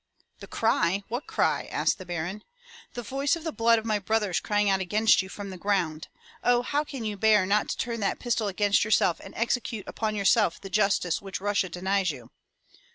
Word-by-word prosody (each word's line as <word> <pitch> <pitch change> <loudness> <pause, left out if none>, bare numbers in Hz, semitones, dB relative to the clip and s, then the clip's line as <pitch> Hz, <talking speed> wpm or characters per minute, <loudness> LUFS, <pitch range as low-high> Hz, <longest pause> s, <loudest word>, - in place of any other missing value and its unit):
*' - - -44
"The - - -10
cry! 195 -3 +1
What 240 +5 -4
cry?'* - - 0
asked - - 0
the 185 - -10
Baron. 175 +5 -4 0.5
"The 240 - -4
voice 270 +7 0
of 335 - -8
the 325 - -2
blood 230 -3 +3
of 220 - -4
my 215 -2 +1
brothers 205 -3 0
crying 205 0 0
out 195 -1 +3
against 210 +2 +3
you 190 - -9
from 200 0 -7
the 185 - -9
ground. 175 -6 -1 0.4
Oh, 245 0 +3
how 290 +4 0
can 275 -5 -7
you 210 -1 -2
bear 210 -1 +4
not 205 +2 +1
to - - -2
turn 235 -1 -3
that 200 - 0
pistol 230 -3 -1
against 205 +1 +2
yourself 200 -5 +2
and - - -12
execute 230 -2 -2
upon 215 -1 -2
yourself 200 -3 +2
the 195 - -10
justice 195 -4 +1
which 195 -2 -6
Russia 200 -1 0
denies 190 +2 0
you? 125 -6 -7
205 Hz, 210 wpm, -27 LUFS, 190-225 Hz, 0.5 s, bear